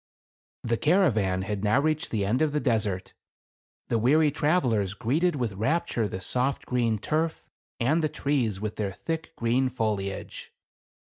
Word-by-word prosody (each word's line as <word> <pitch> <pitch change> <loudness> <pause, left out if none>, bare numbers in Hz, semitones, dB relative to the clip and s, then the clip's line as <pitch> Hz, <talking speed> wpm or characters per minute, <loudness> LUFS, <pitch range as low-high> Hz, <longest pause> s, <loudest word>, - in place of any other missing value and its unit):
J - - -4
The 115 - +2
caravan 110 - +2
had 100 0 -3
now 110 +6 +3
reached 155 +1 0
the 105 -3 -1
end 115 +8 +1
of 155 -2 +2
the 150 - +1
desert. 105 -8 -1 0.8
The 115 - +2
weary 150 +6 +4
travelers 125 - +1
greeted 150 +10 +1
with 120 -6 -2
rap 135 - 0
ture 115 -9 -1
the 95 - -5
soft 125 +8 -1
green 120 -3 +1
turf 160 +8 -1 0.4
and 145 +8 +2
the 155 - +2
trees 135 -9 -1
with 105 0 -4
their 100 -2 -1
thick 160 - -5
green 125 +3 +1
foliage. 105 -5 -3
120 Hz, 160 wpm, -27 LUFS, 105-150 Hz, 0.8 s, weary